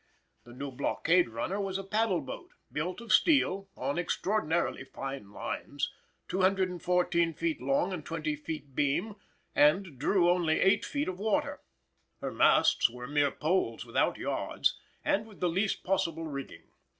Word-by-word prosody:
The 120 - -12
new 140 +2 -5
blockade 165 +5 +2
runner 170 - -2
was 195 -1 -2
a 195 - -5
paddle 200 -3 +1
boat, 135 - -8 0.2
built 160 - -3
of 230 -2 0
steel, 200 - +3
on 140 +6 -1
extraordinarily 175 -4 0
fine 135 -4 -6
lines, - - -4 0.3
214 180 -3 +1
feet 165 -3 -1
long 140 +8 +1
and 170 -4 -5
20 155 -2 -2
feet 150 -2 -7
beam, 145 +10 0 0.4
and 150 -1 +3
drew 175 +4 +3
only 175 -3 +3
8 195 - +4
feet 290 0 -2
of 185 0 -4
water. 215 0 0 0.6
Her - - -4
masts - - +4
were 125 +1 -8
mere 145 +1 +2
poles 155 -7 -1
without - - +1
yards, - - 0 0.3
and 210 +3 +1
with 210 -4 -15
the 180 - +1
least 195 +4 0
possible 165 -4 0
rigging. 140 -3 -7
170 Hz, 150 wpm, -30 LUFS, 145-195 Hz, 0.6 s, 8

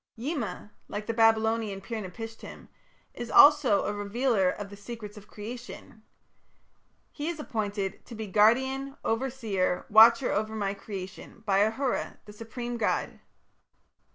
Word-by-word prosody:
Yima, 230 - -4 0.2
like 210 +1 -5
the 230 - -2
Babylonian 225 -2 +2
Pir 220 +3 -5
napishtim, 225 +4 -9 0.4
is 240 -1 -6
also 285 -8 +6
a 210 - -1
revealer 205 -1 +1
of 200 +1 -6
the - - -8
secrets 210 0 -9
of 210 0 -13
creation. 230 0 -9 1.1
He 295 +1 -5
was 335 -2 -3
appointed 205 -7 -3
to 235 - -9
be 220 0 -5
"Guardian, 265 +7 +2
Overseer, 225 -7 -1
Watcher 230 +4 +7
over 215 +2 -1
my 200 -2 -1
Creation" 195 +2 -9
by 195 -2 +3
Ahura, 225 +5 -1
the 210 - -12
supreme 235 +2 -6
god. 220 - -1
220 Hz, 130 wpm, -28 LUFS, 205-240 Hz, 1.1 s, Watcher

